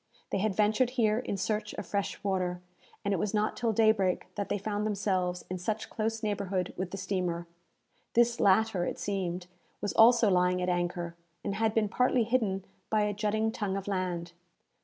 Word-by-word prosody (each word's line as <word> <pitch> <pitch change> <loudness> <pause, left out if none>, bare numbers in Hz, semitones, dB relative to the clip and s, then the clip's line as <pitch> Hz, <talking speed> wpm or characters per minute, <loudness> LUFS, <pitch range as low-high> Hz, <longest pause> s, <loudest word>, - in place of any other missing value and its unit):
They 195 - +1
had 205 -1 0
ventured 215 +4 +3
here 220 -1 +3
in 205 -5 -3
search 210 +3 -2
of - - -5
fresh 200 -1 -3
water, 185 -3 0 0.5
and 200 - +2
it - - +1
was 210 +4 -1
not 210 +1 +1
till 235 -2 0
daybreak 215 -4 +2
that 205 -1 -3
they - - +1
found 205 +1 -2
themselves 190 -4 -1
in 185 0 -4
such 215 +4 -3
close 225 +1 -2
neighbourhood 200 -3 -1
with 185 -1 -3
the 195 - -6
steamer. 180 -3 -2 0.7
This 235 +1 +4
latter, 200 -1 +3
it - - -2
seemed, 185 -3 -2 0.3
was 205 - -2
also 235 0 +6
lying 180 0 +3
at 180 0 0
anchor, 175 -1 -1 0.3
and 200 - -2
had 220 +1 0
been 220 -2 +3
partly 250 +3 +2
hidden 215 -5 0 0.2
by 215 -1 +2
a 210 0 0
jutting 215 +2 0
tongue 200 -3 -2
of 195 - -6
land. 180 -3 -2
200 Hz, 185 wpm, -30 LUFS, 185-220 Hz, 0.7 s, also